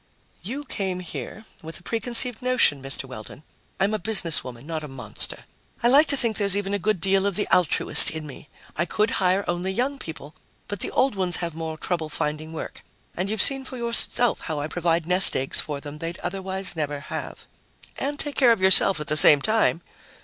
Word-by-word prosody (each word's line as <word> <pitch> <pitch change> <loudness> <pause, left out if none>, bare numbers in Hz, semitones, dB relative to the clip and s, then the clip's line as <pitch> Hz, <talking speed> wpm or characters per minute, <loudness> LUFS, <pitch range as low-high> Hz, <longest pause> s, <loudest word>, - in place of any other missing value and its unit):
"You 260 - -6
came 190 -7 -4
here 170 - -8 0.2
with 160 +1 -6
a - - -23
preconceived 235 +2 0
notion, 250 - +1
Mr. 135 0 -7
Weldon. 125 +2 -11 0.4
I'm 195 +3 0
a 215 - -2
businesswoman, 165 - +2
not 160 0 -6
a - - -7
monster. 125 -6 -6 0.4
I 240 - +4
like 285 +5 +5
to 280 - 0
think 230 -4 +4
there's 200 -2 +4
even 200 0 -4
a 205 - -1
good 205 0 -1
deal 195 +2 0
of 200 - -3
the 205 - -1
altruist 180 -4 +6
in 160 -1 -7
me. 145 +1 -13 0.3
I 170 - -1
could 210 +4 -1
hire 185 +2 0
only 175 +2 -3
young 260 +7 -3
people, 155 - -10 0.3
but 205 -2 -6
the - - -4
old 265 0 0
ones 185 -3 -2
have 170 -2 -4
more 160 0 -7
trouble 165 -2 -4
finding 155 +1 -5
work. 160 - -9 0.3
And 185 +3 -3
you've 215 -2 +4
seen 270 -1 +3
for 255 0 -9
yourself 235 0 +1
how 155 -3 -5
I 145 - -4
provide 165 +1 -2
nest 180 +2 +6
eggs 135 +1 -2
for 145 -2 -6
them 145 +1 -11
they'd 165 +1 -6
otherwise 190 0 -5
never 145 -2 -4
have." - - -8 0.5
"And 290 +2 -4
take 290 - -5
care 250 -4 +5
of 225 - +1
yourself 190 -2 +4
at 150 - -6
the 150 - -2
same 150 -1 +8
time." 215 0 0
180 Hz, 205 wpm, -23 LUFS, 155-215 Hz, 0.5 s, same